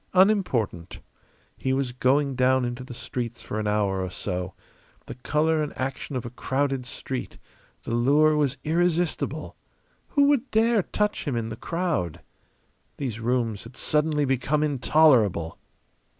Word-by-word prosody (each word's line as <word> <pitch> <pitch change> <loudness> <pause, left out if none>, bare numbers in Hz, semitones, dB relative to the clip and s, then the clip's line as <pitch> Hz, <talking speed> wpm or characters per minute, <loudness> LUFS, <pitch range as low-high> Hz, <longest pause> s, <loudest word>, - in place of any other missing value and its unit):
Unimportant. 180 - +2 0.6
He 130 - -1
was 135 -2 0
going 135 +3 +2
down 130 0 +3
into 120 +1 -4
the 125 -1 -9
streets 120 -1 -5
for 110 - -4
an 105 - -2
hour 100 -2 +1
or 95 - -3
so. 90 +1 -4 0.5
The - - -7
colour 155 +4 +1
and 150 - -4
action 135 +2 -4
of 125 - -3
a 120 - -6
crowded 135 0 -1
street; 130 +2 -5 0.5
the - - -4
lure 145 +6 +4
was 145 -2 +1
irresistible. 170 +1 0 0.5
Who 285 - +3
would 280 -2 +3
dare 225 0 +3
touch 210 +3 -1
him 140 -5 -1
in 115 -1 -2
the 110 - -5
crowd? 165 - -2 0.8
These 120 -6 -4
rooms 115 -3 -1
had 120 +1 -12
suddenly 150 -1 +1
become 135 +3 +1
intolerable. 125 - +3
130 Hz, 145 wpm, -25 LUFS, 115-155 Hz, 0.8 s, lure